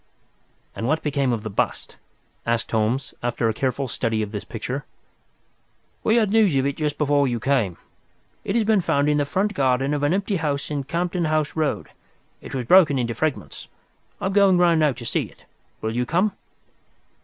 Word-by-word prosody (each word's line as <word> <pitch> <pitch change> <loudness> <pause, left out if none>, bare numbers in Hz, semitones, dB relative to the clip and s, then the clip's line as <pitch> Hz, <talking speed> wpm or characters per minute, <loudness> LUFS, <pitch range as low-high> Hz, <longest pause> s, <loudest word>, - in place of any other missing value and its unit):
"And 115 - -3
what 155 +3 0
became 140 -3 0
of 115 -3 -2
the 110 - -4
bust?" - - -2 0.5
asked 115 -1 -1
Holmes, 115 +4 0
after 120 -1 0
a 110 - +1
careful 135 +3 -1
study 115 -2 -1
of 105 - -6
this 105 -2 -5
picture. - - -5 1.2
"We 220 - +3
had 220 -4 +3
news 215 -8 +4
of 135 0 +2
it 140 0 -1
just 150 -2 -2
before 145 -1 +2
you 120 -2 -1
came. 120 -8 0 0.7
It 195 - -2
has 230 -2 +2
been 215 -2 +3
found 145 -4 +1
in 150 - +2
the 145 - 0
front 195 +7 0
garden 135 -2 +1
of 145 - -1
an 145 +1 +2
empty 200 0 -1
house 150 -2 -2
in 140 -2 -2
Campden 175 +2 -1
House 155 -1 0
Road. 155 -2 -1 0.5
It - - -8
was 125 -2 -2
broken 160 -2 +6
into 120 -2 -1
fragments. 155 +5 -3 0.5
I - - -4
am 190 - 0
going 200 -2 +5
round 170 -2 +4
now 155 -2 +4
to - - -9
see - - -1
it. - - -18 0.4
Will 110 +1 -2
you 125 0 0
come?" 185 +8 +2
145 Hz, 195 wpm, -23 LUFS, 125-175 Hz, 1.2 s, broken